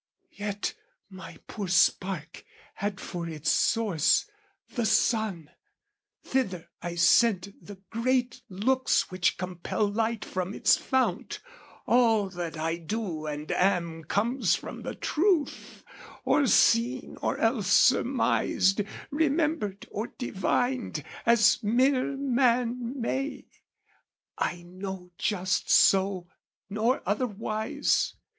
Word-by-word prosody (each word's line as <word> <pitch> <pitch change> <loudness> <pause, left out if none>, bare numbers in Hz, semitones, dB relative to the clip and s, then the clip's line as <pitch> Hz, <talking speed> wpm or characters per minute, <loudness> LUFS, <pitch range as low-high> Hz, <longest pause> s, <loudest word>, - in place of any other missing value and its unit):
Yet 205 0 -3 0.4
my 185 0 -10
poor 205 -3 -5
spark 180 -2 +1 0.3
had 200 -1 -4
for 170 -3 -5
its 155 -1 -1
source, 210 - +2 0.5
the 240 - -1
sun; 215 - +1 0.7
Thither 195 -11 -2
I 175 0 -5
sent 195 +2 +3
the 205 - -10 0.2
great 250 +2 0
looks 250 +5 +1
which 185 -1 +1
compel 185 +3 -2
Light 220 +2 -1
from 185 +2 -4
its - - +4
fount: 260 -1 -1 0.5
all 225 -5 +3
that 175 -3 -5
I 165 +2 -1
do 170 -3 -4
and 150 0 -5
am 170 -4 0
Comes 215 - +1
from - - -8
the - - -6
truth, 335 -2 -1 0.4
or 285 -2 +3
seen 240 +3 +3
or - - -1
else 225 -4 0
surmised, 210 -5 +3 0.3
Remembered 300 - 0
or 215 +3 -3
divined, 245 +3 -1 0.2
as 235 0 +5
mere 255 +5 +1
man 250 -1 0
may: 270 +4 -3 0.9
I 175 0 -3
know 185 0 -8
just 190 -2 -1
so, 190 -2 +4 0.5
nor 225 +5 0
otherwise. 215 +1 -1
210 Hz, 105 wpm, -27 LUFS, 185-245 Hz, 0.9 s, as